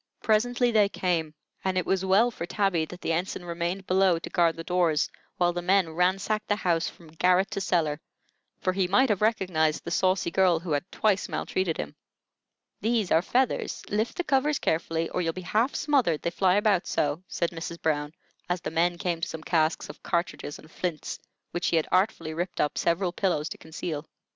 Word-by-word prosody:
Presently 240 +3 +2
they 210 -3 +4
came, 165 -6 -1 0.3
and 190 -1 0
it 185 - +1
was 190 -1 +1
well 200 +6 +4
for 170 -6 -6
Tabby 195 -5 +1
that 180 +3 -11
the - - -1
ensign 175 +1 -2
remained 175 +3 -3
below 185 -2 +3
to 165 - -7
guard 170 -2 +3
the 165 - -6
doors 170 -4 +2 0.3
while 175 -1 +2
the 175 - -3
men 185 -1 +2
ransacked 195 +5 +1
the 205 - +2
house 170 -5 0
from 165 -2 -16
garret 180 +4 +2
to 195 - -2
cellar; 160 -5 0 0.6
for 185 - +1
he 190 -1 +1
might 255 +8 +4
have 210 -2 +1
recognized 185 -8 +1
the 170 - -5
saucy 185 -1 +1
girl 185 -2 +4
who 170 -1 -6
had 150 +6 -1
twice 205 -2 +1
maltreated 185 -4 -1
him. 75 - -5 0.8
"These 220 -2 0
are 160 - +5
feathers; 250 +7 0
lift 215 +3 -1
the 355 - 0
covers 285 0 +2
carefully 165 0 0
or 180 - -1
you'll 165 -1 -1
be 185 - -6
half 215 - +1
smothered, 255 - +1
they 170 - 0
fly 185 +1 +3
about 205 -3 +2
so," 145 +3 0
said 170 - -1
Mrs. 170 0 -6
Brown, 150 -2 0 0.4
as 180 0 0
the - - -4
men 170 +2 +1
came 170 -1 -2
to - - -1
some 160 -1 -7
casks 160 -1 +1
of 150 - -11
cartridges 170 -4 -2
and 155 - -16
flints, 175 -4 -4 0.3
which 175 - -2
she - - +2
had 160 - +2
artfully 185 -4 +1
ripped 175 +3 -4
up 150 - +1
several 175 +2 +1
pillows 175 -5 0
to - - -7
conceal. 160 -1 -5
180 Hz, 200 wpm, -27 LUFS, 165-195 Hz, 0.8 s, are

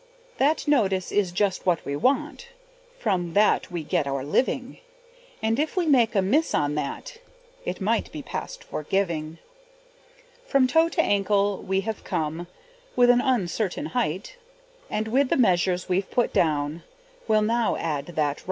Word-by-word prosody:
That 300 +3 +2
notice 195 -10 +2
is 200 -4 +1
just 190 0 -1
what 175 -3 +1
we 140 - -2
want, 270 - 0 0.5
From 180 -6 -1
that 210 +1 +3
we 170 -2 -4
get 145 -1 0
our 135 -1 -2
living; 255 - -1 0.6
And 225 +3 +1
if 310 +5 -1
we 360 - +2
make 245 -7 +3
a 195 - +3
miss 290 +12 +1
on 145 -1 +1
that, 150 - -4 0.5
It - - -3
might - - 0
be - - -7
past - - -6
forgiving. 165 - -2 1.1
From 275 - +4
toe 325 +6 +3
to 335 - +1
ankle 200 0 +1
we 190 0 0
have 220 +1 -5
come, 160 +3 -3 0.5
With 245 0 +6
an 245 0 +3
uncertain 225 - -1
height, 235 - -2 0.5
And 215 +1 -2
with 260 +4 +2
the - - +2
measures 180 -5 +2
we've 185 +1 0
put 245 - 0
down 150 0 +1 0.5
Will 215 -1 +3
now 230 +1 +1
add 150 -4 -3
that 175 - -11
right. 145 - -4
200 Hz, 160 wpm, -25 LUFS, 170-250 Hz, 1.1 s, With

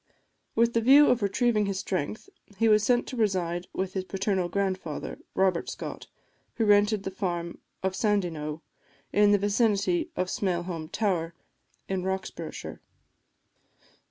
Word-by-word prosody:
With 235 +1 +3
the 230 - +2
view 275 +5 +7
of 250 -1 +2
retrieving 210 +1 +2
his 195 -1 -2
strength, 185 - -3 0.3
he 225 - +3
was 215 -1 +5
sent 240 +2 +3
to - - -7
reside 180 -6 0
with 190 0 -3
his 190 - -2
paternal 190 -1 -1
grandfather, 185 -5 -3 0.2
Robert 185 -3 +1
Scott, - - -7 0.5
who 225 - +1
rented 205 0 +4
the 195 - -4
farm 175 -3 -3 0.2
of 190 0 0
Sandyknowe, 165 -8 -1 0.5
in 205 0 +5
the 205 - +5
vicinity 200 -3 +1
of 185 - 0
Smailholm 175 -4 -2
Tower, 170 -6 -1 0.5
in 190 -1 -1
Roxburghshire. 190 +1 -5
195 Hz, 135 wpm, -27 LUFS, 180-210 Hz, 0.5 s, view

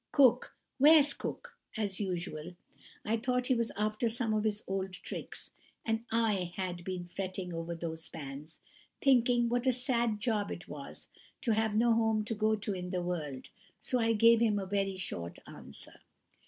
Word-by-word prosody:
Cook! 255 -3 +4 0.2
Where's 295 +1 +7
Cook?' - - -6 0.2
as 200 -3 -1
usual. 175 -3 -3 0.5
I 225 +2 +1
thought 250 +2 0
he 260 - +3
was 235 -2 0
after 215 +2 +1
some 225 -1 0
of 215 0 +1
his 210 -1 0
old 190 -1 -2
tricks, 185 - -6 0.3
and 225 0 -1
I 210 -6 +1
had 180 -2 -3
been 180 -1 -4
fretting 185 0 -4
over 165 +1 -4
those 165 -1 -5
pans, 145 +1 -8 0.4
thinking 245 -3 +4
what 245 +2 0
a - - +6
sad 235 -3 0
job 215 -3 0
it - - -6
was - - -8 0.3
to 235 - +1
have 220 -1 +1
no 230 +1 +4
home 225 -1 +2
to 220 - -2
go 215 0 +2
to 205 -1 -3
in 180 -1 -4
the 180 -1 -1
world, 150 -7 -4 0.3
so 250 - 0
I 230 0 +3
gave 230 +1 +6
him 220 -3 +3
a 195 - -2
very 195 0 -1
short 85 - -4
answer. - - -10
210 Hz, 175 wpm, -32 LUFS, 180-230 Hz, 0.5 s, Where's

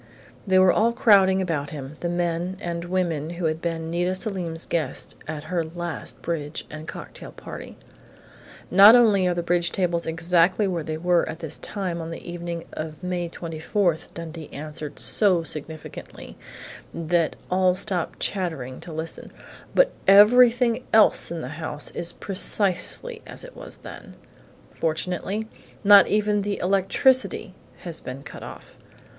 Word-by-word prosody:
They 190 -1 +4
were 185 -1 +6
all 230 +2 +2
crowding 195 -5 +5
about 150 -5 -2
him 140 0 -8
the 175 - -2
men 175 +1 -1
and 170 -2 -4
women 175 -4 -1
who 175 - -2
had 160 0 -1
been 165 -1 -3
Nita 175 +2 0
Selim's 180 -5 -3
guests 155 -6 -2
at 155 -1 -5
her 170 +1 -1
last 170 -1 -6
bridge 155 -3 -3
and 155 +1 -8
cocktail - - -9
party.... - - -9 0.9
"Not 200 +5 +9
only 210 -6 +5
are 175 - +1
the 175 - -2
bridge 175 0 +1
tables 175 -3 -1
exactly 170 +4 +2
where 175 -3 -2
they 155 0 -4
were 175 +1 +2
at - - -5
this 160 -3 -4
time 185 -5 -4
on 165 - -6
the 165 - -8
evening 170 -1 -5
of 155 +1 -6
May 180 -1 -2
24," 165 +2 -1 0.2
Dundee 165 -2 -7
answered 150 0 -6
so 185 -6 +2
significantly 155 0 -8 0.6
that 170 -1 0 0.2
all 185 0 +3
stopped 185 -3 -2
chattering 160 -10 -3
to 175 - -10
listen, 160 +1 -5 0.4
"but - - +5 0.2
everything 235 +4 +6
else 220 -1 +5
in 170 -1 -4
the - - -5
house 150 -2 -3
is 170 - -2
precisely 205 - 0
as - - -8
it - - -12
was - - -9
then. - - -11 0.6
Fortunately, 180 +6 -2 0.4
not 200 -1 +8
even 210 0 +1
the 200 0 -2
electricity 195 +3 +2 0.3
has 170 -3 -5
been 130 +2 -7
cut - - -10
off! - - -11
175 Hz, 150 wpm, -24 LUFS, 160-195 Hz, 0.9 s, Not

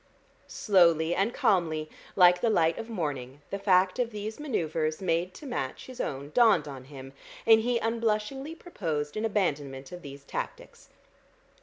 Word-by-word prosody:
Slowly 170 -5 +3
and 195 +6 +1
calmly, 160 -8 +1 0.3
like 180 -1 +6
the 235 - +2
light 165 -6 +2
of 225 - -6
morning, 145 - -4
the 200 - -3
fact 185 +1 +3
of 245 -2 +1
these 215 +1 -6
manoeuvres 160 - -1
made 180 0 -1
to 300 - -11
match 135 - -4
his 255 -1 -6
own 140 +1 -4
dawned 225 -7 +4
on 135 -3 -8
him, 135 -1 -11 0.3
and 225 -1 +7
he 240 +1 +1
unblushingly 230 +6 -1
proposed 160 - -4
an 215 +1 -1
abandonment 145 -10 -2
of 180 0 -8
these 140 -2 -10
tactics. - - -7
180 Hz, 155 wpm, -28 LUFS, 150-225 Hz, 0.3 s, and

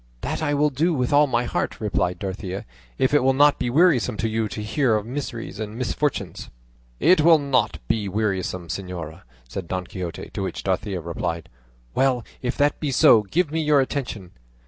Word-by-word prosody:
"That - - -3
I 145 -2 +1
will 150 +1 +2
do 160 +5 +1
with 125 0 0
all 145 +1 +6
my 120 -2 +1
heart," - - -2
replied 100 -4 -1
Dorothea, 95 -1 -5 0.3
"if 130 - +1
it 145 - +4
will 135 0 +3
not 145 +1 +5
be 120 - -1
wearisome 140 -6 +3
to 115 - 0
you 110 0 -1
to 105 0 -6
hear 120 +1 +1
of 105 -1 -1
miseries 120 -4 -5
and 110 0 -5
misfortunes." 130 +3 -2 0.5
"It 180 -2 +5
will 165 +1 +7
not 130 -7 +1
be 105 -3 0
wearisome, 95 -3 -2
señora," 90 -3 -6 0.3
said 85 +8 -6
Don 90 0 -3
Quixote; 90 -3 -6
to - - -3
which - - -4
Dorothea 95 -4 -1
replied, 85 -1 -4 0.4
"Well, 130 -3 +1 0.2
if 125 0 -2
that 145 0 +2
be 150 - -2
so, 120 -4 +6
give 150 - 0
me 160 +1 0
your 150 -2 +4
attention." 125 -9 -3
120 Hz, 190 wpm, -23 LUFS, 95-145 Hz, 0.5 s, will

